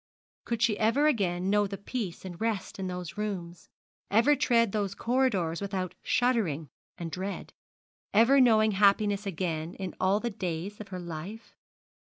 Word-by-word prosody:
Could 235 -1 -1
she 215 -3 +2
ever 230 +7 +3
again 190 -9 +1
know 205 0 +3
peace 200 -1 -5
and 180 0 -8
rest 220 -4 -2
in 190 - -2
those 180 -1 -6
rooms; 180 -5 -5 0.4
ever 235 +8 +4
tread 235 -5 +3
those 200 -2 -2
corridors 225 -10 0
without 190 -2 -3
shuddering 200 - +1 0.3
and 165 -1 -5
dread, 190 +3 -5 0.6
ever 235 +6 +5
know 225 -4 +6
happiness 205 0 +3
again 165 -3 -3
in 190 -2 -5
all 190 +2 +3
the 235 +1 -3
days 185 0 -4
of 210 - -8
her 190 -2 -6
life? 175 +6 -8
200 Hz, 150 wpm, -29 LUFS, 180-225 Hz, 0.6 s, know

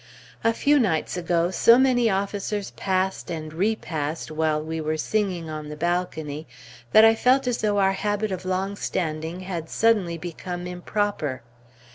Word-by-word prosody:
A 230 - +4
few 290 +5 +3
nights 185 -10 0
ago, 175 0 0
so 230 +5 +6
many 250 -3 +3
officers 200 +1 -2
passed 190 0 -1
and 155 -2 -5
repassed 165 -6 -2
while 155 -1 +1
we 160 +1 -4
were 155 0 -1
singing 185 -2 -1
on 155 -1 -6
the 150 - -6
balcony, 160 -3 -2 0.4
that 215 +1 +8
I 225 - +7
felt 255 +4 +3
as 245 -1 0
though 210 -1 +1
our 195 -1 +3
habit 205 +1 -1
of 185 -1 -4
long 190 +2 -1
standing 165 -2 -3
had 175 -4 -5
suddenly 205 -7 +2
become 175 +1 -6
improper. 180 - -2
185 Hz, 155 wpm, -24 LUFS, 160-205 Hz, 0.4 s, that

